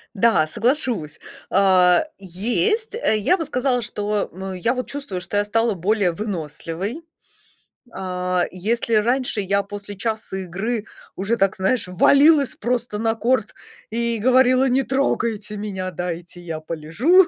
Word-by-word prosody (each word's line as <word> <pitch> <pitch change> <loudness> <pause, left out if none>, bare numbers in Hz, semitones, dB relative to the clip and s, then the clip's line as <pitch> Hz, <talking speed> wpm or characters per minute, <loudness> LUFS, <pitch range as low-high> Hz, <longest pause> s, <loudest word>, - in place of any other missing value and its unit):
Да, 200 -7 +3
соглашусь. 225 - +2 0.3
А 185 -2 +4
есть. 240 - 0
Э, 460 - +1
я 285 - +2
бы 325 - -3
сказала, 250 -2 0
что, 210 -1 -1
м, 190 +1 -6
я 185 +7 0
вот 255 -1 -4
чувствую, 275 -11 -4
что 190 +3 -2
я 205 - +2
стала 225 +2 +1
более 195 +1 +1
выносливой. 180 - -4 0.9
А 180 -1 -1
если 225 +5 0
раньше 240 +1 +2
я 200 +1 +1
после 205 0 -8
часа 215 -2 -3
игры 200 +5 -3 0.3
уже, 200 +5 -1
так 195 -3 +2
знаешь, 195 +4 +1
валилась 280 - +4
просто 240 -2 -2
на 225 +1 +1
корт 230 -1 0 0.4
и 235 +1 -1
говорила: 255 +3 +4
"Не 260 +2 +2
трогайте 230 -6 -1
меня, 190 -3 -4
дайте 175 0 -6
я 165 -2 -5
полежу". 165 - +3
210 Hz, 140 wpm, -21 LUFS, 185-245 Hz, 0.9 s, А